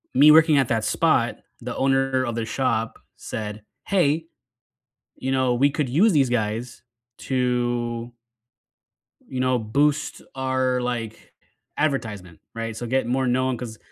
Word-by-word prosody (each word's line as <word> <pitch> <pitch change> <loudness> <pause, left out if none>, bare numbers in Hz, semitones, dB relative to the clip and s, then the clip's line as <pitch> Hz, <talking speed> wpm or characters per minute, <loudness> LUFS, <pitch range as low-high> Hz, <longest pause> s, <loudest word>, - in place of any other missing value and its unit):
me 145 +3 +7
working 155 -1 +6
at 130 - +2
that 115 -2 0
spot, - - +2 0.2
the - - -5
owner 135 -1 +1
of 120 -2 -3
the 115 -1 -2
shop 115 -3 -1 0.2
said, 105 -1 -6 0.2
"Hey, 165 -4 +1 0.9
you 130 +1 -3
know, 130 -2 +2
we 140 +4 +3
could 145 -2 -2
use 185 - +4
these 140 -5 +3
guys 115 +1 -2 0.5
to" 120 -2 -1 1.2
"you 130 - -5
know, 130 0 +2
boost 145 +7 0
our, 130 -1 0
like, 115 -3 -5 0.4
advertisement," 105 - -2
right? 115 -1 -4
So, 120 - -5
get 130 -1 0
more 130 +1 0
known 130 0 +1
'cause" 115 -3 -7
125 Hz, 140 wpm, -23 LUFS, 115-135 Hz, 1.2 s, me